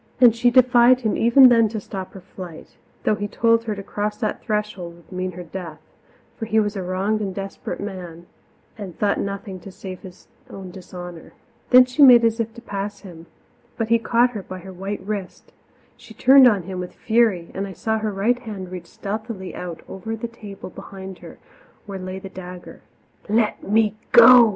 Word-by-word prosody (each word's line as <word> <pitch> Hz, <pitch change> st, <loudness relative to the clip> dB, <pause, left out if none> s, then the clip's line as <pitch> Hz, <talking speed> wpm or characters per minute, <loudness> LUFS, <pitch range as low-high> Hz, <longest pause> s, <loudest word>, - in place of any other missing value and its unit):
And 240 Hz, -3 st, +7 dB
she 245 Hz, +1 st, +3 dB
defied 250 Hz, 0 st, +5 dB
him 220 Hz, -3 st, 0 dB
even 250 Hz, +3 st, +7 dB
then 230 Hz, -2 st, +4 dB
to 220 Hz, 0 st, -4 dB
stop 190 Hz, -2 st, -7 dB
her 190 Hz, -, -10 dB
flight, 180 Hz, -3 st, -10 dB, 0.3 s
though -, -, +2 dB
he 205 Hz, 0 st, -3 dB
told 230 Hz, +2 st, +2 dB
her 215 Hz, -2 st, -2 dB
to 200 Hz, -, -7 dB
cross 210 Hz, +1 st, -3 dB
that 215 Hz, -3 st, -3 dB
threshold 210 Hz, -5 st, -3 dB
would 170 Hz, +2 st, -21 dB
mean 185 Hz, 0 st, -3 dB
her 180 Hz, +1 st, -8 dB
death; 170 Hz, -2 st, -8 dB, 0.6 s
for 225 Hz, -, -3 dB
he 220 Hz, 0 st, +3 dB
was 205 Hz, -1 st, 0 dB
a 195 Hz, -, -3 dB
wronged 190 Hz, +4 st, -1 dB
and 195 Hz, -3 st, -3 dB
desperate 195 Hz, 0 st, -6 dB
man 180 Hz, -4 st, -7 dB, 0.5 s
and 190 Hz, -5 st, -8 dB
thought 205 Hz, -1 st, +1 dB
of -, -, 0 dB
nothing 200 Hz, -2 st, -6 dB
save 190 Hz, 0 st, -9 dB
his 185 Hz, -1 st, -14 dB, 0.2 s
own 190 Hz, -2 st, -9 dB
dishonour. 175 Hz, -2 st, -10 dB, 0.4 s
Then 250 Hz, 0 st, +8 dB
she 250 Hz, +4 st, -2 dB
made 245 Hz, -4 st, +9 dB
as 225 Hz, 0 st, +1 dB
if 230 Hz, 0 st, -1 dB
to 235 Hz, -, -12 dB
pass 200 Hz, -1 st, -5 dB
him, 170 Hz, -4 st, -12 dB, 0.5 s
but 225 Hz, -2 st, -2 dB
he 230 Hz, 0 st, +4 dB
caught 235 Hz, +2 st, +2 dB
her 215 Hz, -4 st, -5 dB
by 185 Hz, 0 st, -8 dB
her 190 Hz, +1 st, -10 dB
white 195 Hz, +1 st, -5 dB
wrist; 200 Hz, -3 st, -6 dB, 0.4 s
she -, -, -15 dB
turned 265 Hz, 0 st, +7 dB
on 205 Hz, -6 st, +2 dB
him 185 Hz, +1 st, -6 dB
with 180 Hz, 0 st, -7 dB
fury, 220 Hz, -7 st, +1 dB
and 195 Hz, +1 st, -3 dB
I 190 Hz, -, -8 dB
saw 220 Hz, +5 st, -1 dB
her 215 Hz, -1 st, -2 dB
right 215 Hz, +5 st, +1 dB
hand 200 Hz, -7 st, -7 dB
reach 180 Hz, -2 st, -7 dB
stealthily 205 Hz, 0 st, -6 dB
out 175 Hz, -2 st, -7 dB
over 220 Hz, +4 st, -5 dB
the 225 Hz, +2 st, -5 dB
table 210 Hz, -5 st, -10 dB
behind 190 Hz, +1 st, -10 dB
her, -, -, -12 dB, 0.5 s
where 200 Hz, -2 st, -6 dB
lay 185 Hz, 0 st, -6 dB
the 190 Hz, -, -8 dB
dagger. 180 Hz, -1 st, -10 dB, 0.5 s
"Let 215 Hz, 0 st, +1 dB
me 215 Hz, 0 st, +2 dB, 0.2 s
go!" 245 Hz, -3 st, +9 dB
200 Hz, 200 wpm, -22 LUFS, 185-225 Hz, 0.6 s, made